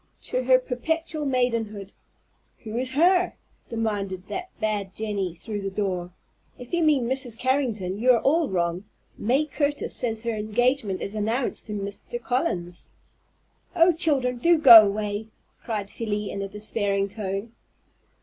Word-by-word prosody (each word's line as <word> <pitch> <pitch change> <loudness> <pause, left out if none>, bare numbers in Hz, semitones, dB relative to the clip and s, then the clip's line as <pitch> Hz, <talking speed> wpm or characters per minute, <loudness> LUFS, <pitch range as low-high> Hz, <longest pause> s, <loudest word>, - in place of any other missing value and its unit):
To 255 0 -2
her 255 0 +6
perpetual 310 +5 -3
maidenhood 230 -6 -1 0.4
" - - -43
"Who 220 -1 -6
is 255 +2 -1
'her'?" 355 +6 +3 0.4
demanded 200 -5 -3
that 370 0 -5
bad 210 -3 -2
Jenny 200 -5 -3
through 205 +3 -6
the 195 - -3
door. 190 -3 -2 0.5
"If 245 +4 -12
you 345 - +2
mean 295 -7 +3
Mrs. 255 -3 0
Carrington, 230 -8 -1
you 250 +3 +1
are 235 - +2
all 315 +2 +2
wrong. 175 +1 -1 0.3
May 260 +8 +2
Curtis 290 0 -1
says 225 -2 -1
her 230 -1 -1
engagement 215 -1 0
is 200 - -5
announced 220 +5 -2
to 210 - -5
Mr. 205 - -5
Collins." 185 - -2 0.9
"Oh, 345 +1 +5
children, 275 -6 +1
do 340 +6 +4
go 235 -8 +10
away!" 205 +1 -3 0.4
cried 210 -3 -4
Felie 210 -2 -3
in 200 - -4
a 195 - -3
despairing 205 -1 -1
tone. 200 +1 -5
225 Hz, 150 wpm, -25 LUFS, 200-265 Hz, 0.9 s, go